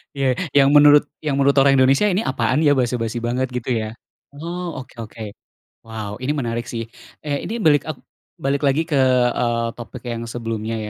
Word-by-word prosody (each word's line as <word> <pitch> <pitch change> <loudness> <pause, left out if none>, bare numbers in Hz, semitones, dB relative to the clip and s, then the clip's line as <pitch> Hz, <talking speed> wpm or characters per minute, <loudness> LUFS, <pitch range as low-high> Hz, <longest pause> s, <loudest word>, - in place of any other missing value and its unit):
Ya 135 -2 +1 0.2
yang 140 0 +5
menurut 145 0 +7 0.2
yang 150 -3 -1
menurut 140 0 +2
orang 135 0 +5
Indonesia 135 +9 +4
ini 195 +3 0
apaan 130 +4 0
ya, 145 - +5
basa 125 -3 +1
basi 115 0 -3
banget 125 +2 -2
gitu 125 0 -5
ya? 110 -1 -3 0.4
Oh 170 +3 -5
oke 130 - -12
oke. 110 +1 -9 0.6
Wow 110 -1 -6
ini 130 +3 -2
menarik 120 -3 -3
sih. 115 -1 -4 0.4
Eh 145 -2 -2
ini 230 +2 -4
balik 150 -1 +3
ek 155 - -3 0.4
balik 140 +1 -1
lagi 145 +4 +2
ke, 145 -5 0 0.3
eee, 115 -1 0
topik 115 +1 -9
yang 115 -1 -4
sebelumnya 115 -1 -4
130 Hz, 180 wpm, -21 LUFS, 115-145 Hz, 0.6 s, menurut